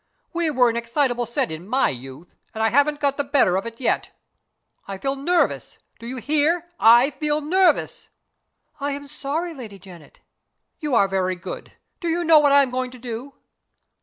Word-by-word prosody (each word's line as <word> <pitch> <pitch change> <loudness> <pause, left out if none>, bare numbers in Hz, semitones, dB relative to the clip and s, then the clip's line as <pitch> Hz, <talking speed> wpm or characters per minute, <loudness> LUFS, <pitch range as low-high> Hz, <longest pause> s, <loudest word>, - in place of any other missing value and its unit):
We 340 -1 +1
were 255 -4 +3
an 230 - -4
excitable 240 0 0
set 235 -8 -1
in 160 +4 -7
my 260 +5 +2
youth 135 +6 -10 0.2
and 220 - -1
I 225 - +3
haven't 290 +3 +2
got 280 -1 0
the 285 - 0
better 275 -10 +2
of 195 +4 -2
it 230 0 -9
yet. 260 - 0 0.8
I 195 0 -5
feel 270 +7 -2
nervous. 340 +6 0 0.2
Do 230 - -9
you 255 +2 -5
hear? 310 +6 +1
I 240 +5 +6
feel 300 0 -1
nervous." 345 +2 +1 0.7
"I 285 0 -2
am 285 0 -7
sorry, 300 +4 -4
Lady 225 -9 -9
Janet." 175 -4 -15 0.6
"You 295 -5 -1
are 200 -3 +4
very 185 -1 -1
good. 180 - -8 0.3
Do 345 - -4
you 335 +1 0
know 325 -2 +6
what 290 -1 +3
I 280 0 +7
am 260 - -4
going 255 0 -2
to 255 - -12
do?" 245 +3 -7
265 Hz, 190 wpm, -22 LUFS, 225-295 Hz, 0.8 s, I